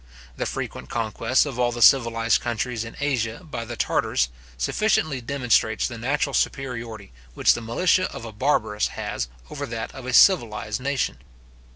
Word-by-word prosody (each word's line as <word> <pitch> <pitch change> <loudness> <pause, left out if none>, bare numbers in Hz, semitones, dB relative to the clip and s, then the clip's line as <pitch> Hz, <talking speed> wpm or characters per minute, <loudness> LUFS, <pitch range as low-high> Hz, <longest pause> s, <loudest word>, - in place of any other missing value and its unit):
The - - -2
frequent - - -5
conquests - - +1
of 125 - -5
all 120 -1 +2
the 120 -1 +1
civilized 115 -4 +4
countries 120 0 -2
in 115 - -10
Asia 125 -2 -1
by 145 -8 -6
the 120 +1 -6
Tartars, 65 - +1 0.3
sufficiently 145 - +1
demonstrates 120 -4 +1
the 120 -2 -7
natural 140 +3 0
superiority 115 -8 -2 0.2
which - - +5
the 120 - -4
militia 180 +11 +1
of - - -8
a 115 - -7
barbarous 105 -3 +1
has - - -3 0.2
over - - -4
that 115 0 -5
of 130 -1 -9
a 125 - -3
civilized 115 - +4
nation. 140 0 -1
120 Hz, 160 wpm, -24 LUFS, 115-135 Hz, 0.3 s, which